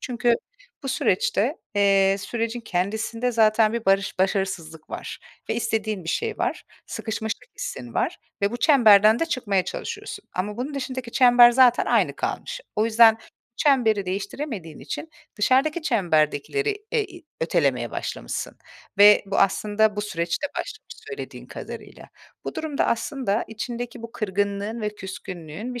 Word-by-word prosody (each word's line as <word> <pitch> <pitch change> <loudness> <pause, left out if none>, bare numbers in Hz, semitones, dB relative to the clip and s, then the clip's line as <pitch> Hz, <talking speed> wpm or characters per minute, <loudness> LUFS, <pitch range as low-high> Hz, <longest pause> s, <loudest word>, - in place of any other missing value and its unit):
Çünkü 240 -1 +1 0.5
bu 270 - -4
süreçte, 235 - +1 0.2
eee, 195 -1 +4
sürecin 230 +3 -3
kendisinde 220 +5 -2
zaten 220 -1 +4
bir 235 -1 -3
barış 195 0 +2
başarısızlık 185 -5 -2
var - - -6 0.3
ve - - 0
istediğin 220 -4 -2
bir - - -7
şey 445 - -2
var. - - -2 0.2
Sıkışmışlık 220 0 -4
hissin 120 -2 -6
var - - 0 0.2
ve 200 - +3
bu 240 - -3
çemberden 220 -5 +6
de 330 - 0
çıkmaya 205 - 0
çalışıyorsun 405 - -6
ama 205 +3 -2
bunun 270 +4 -4
dışındaki 260 -3 -4
çember 245 -2 +7
zaten 245 0 +5
aynı - - +2
kalmış. - - -4 0.2
O 215 - +3
yüzden 225 0 +6 0.4
çemberi 225 -9 +3
değiştiremediğin 195 - -5
için 155 - -6 0.3
dışarıdaki 270 +9 +2
çemberdekileri 205 - +1 0.2
e 455 - +2
i 360 -3 -13 0.2
ötelemeye 140 -8 +1
başlamışsın - - -5 0.4
ve 205 +1 +8
bu 195 - -1
aslında 210 +2 +2
bu - - 0
süreçte 170 +4 -2
başlamış 435 - -7
söylediğin 430 -1 -8
kadarıyla. - - -9 0.4
Bu - - -5
durumda 305 -3 -1
aslında 230 -2 -1
içindeki 240 +1 -6
bu 230 0 -8
kırgınlığın 205 +2 -2
ve 210 -1 -3
küskünlüğün 190 +2 -7
bir 245 - -5
220 Hz, 140 wpm, -24 LUFS, 195-245 Hz, 0.5 s, ve